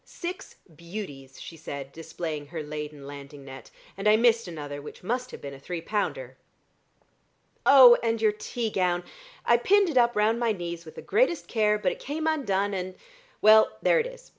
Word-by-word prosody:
"Six 360 +2 -7 0.2
beauties," 150 -6 -9
she 165 - -9
said, 140 -3 -7
displaying 160 -1 -6
her 160 0 -6
laden 150 -1 -7
landing 140 0 -10
net, 135 -2 -11 0.3
"and 195 +2 +1
I 215 - +6
missed 230 -2 +3
another 145 -4 -7
which 150 - -11
must 250 +5 -2
have - - -10
been 140 -1 -7
a 135 - -11
three 175 +5 -5
pounder. 210 - -3 1.3
Oh, 260 -3 +9
and 230 -1 0
your 215 -1 +3
tea 220 +2 -4
gown! 180 -2 0 0.4
I 235 - +5
pinned 395 +9 +3
it 260 - +3
up 240 0 +3
round 215 +2 +2
my 235 -2 +1
knees 170 -3 -6
with 160 - -12
the - - -9
greatest 415 - +1
care, 210 -2 +2
but 195 -3 0
it - - -8
came 310 +3 -4
undone, 205 -11 0
and, 185 -1 -4 0.5
well 215 +1 +6
there - - +4
it 470 - -1
is. - - -13
200 Hz, 190 wpm, -26 LUFS, 155-240 Hz, 1.3 s, Oh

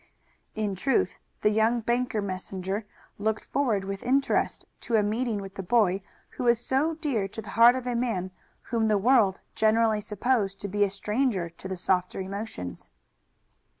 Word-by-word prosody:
In 215 -2 -1
truth, 270 - 0 0.2
the 210 - +4
young 220 +2 +2
bank 240 +1 0
messenger 195 0 -3 0.3
looked 220 +1 -1
forward 230 -9 0
with 195 0 -4
interest 275 +3 +1
to 235 - -1
a 215 - +4
meeting 220 +2 0
with 195 -1 -7
the - - -5
boy 195 -1 +2 0.3
who - - -4
was 235 -1 +4
so 275 +6 +1
dear 275 -11 -1
to 205 - -9
the 220 - -7
heart 235 +2 +7
of 255 -1 -4
a 250 - -1
man 225 -7 -1 0.4
whom 225 -2 +2
the 210 -1 +3
world 210 -3 +3
generally 220 0 +3
supposed 210 -1 0
to 200 - -3
be 205 +1 +1
a 200 - +2
stranger 200 -2 -1
to 170 +3 -9
the 190 -1 -4
softer 180 +1 0
emotions. 190 - -6
215 Hz, 170 wpm, -27 LUFS, 195-240 Hz, 0.4 s, heart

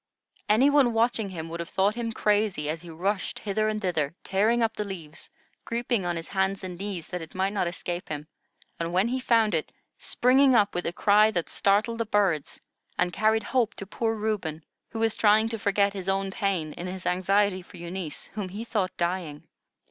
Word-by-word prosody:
Any 250 +7 +5
one 275 -5 +4
watching 225 -2 +1
him 165 -3 -6
would 170 +1 -5
have 170 - -5
thought 195 +2 +2
him 230 0 -3
crazy, 210 -7 +1
as 160 +1 -3
he 175 - -11
rushed 190 +5 -2
hither 215 +1 0
and 215 0 -1
thither, 165 -7 -1
tearing 220 +5 +2
up 225 0 0
the 210 - -2
leaves, 170 -6 -8 0.3
creeping 235 -5 -1
on 175 - -1
his 165 0 -6
hands 190 0 0
and 185 -1 -5
knees 195 -5 -4
that 180 - -4
it 165 +2 -10
might 190 +2 0
not 195 -4 0
escape 175 +1 -5
him, 150 0 -5 0.5
and 170 +1 -2
when 190 +5 +3
he 260 +1 -1
found 230 -4 +3
it, 160 -2 -1 0.3
springing 260 +1 +4
up 205 -3 +4
with 175 - -2
a - - 0
cry 210 +4 +4
that 175 -6 -2
startled 215 +4 +1
the 230 - 0
birds, 195 -8 +1 0.4
and 180 0 +1
carried 220 +1 +2
hope 230 -1 0
to 200 - -7
poor 225 +3 -1
Reuben, 205 -8 -2 0.3
who 225 - -7
was 225 -1 +1
trying 215 +1 +4
to 225 -1 -4
forget 200 0 +2
his 195 -1 -4
own 195 0 0
pain 185 -7 -1
in 175 - -6
his 185 0 -6
anxiety 185 +1 +2
for 180 +1 -14
Eunice, 170 -2 -5
whom 205 -4 -4
he 205 +5 -6
thought 205 -6 -2
dying. 170 -4 -2
195 Hz, 205 wpm, -27 LUFS, 175-220 Hz, 0.5 s, Any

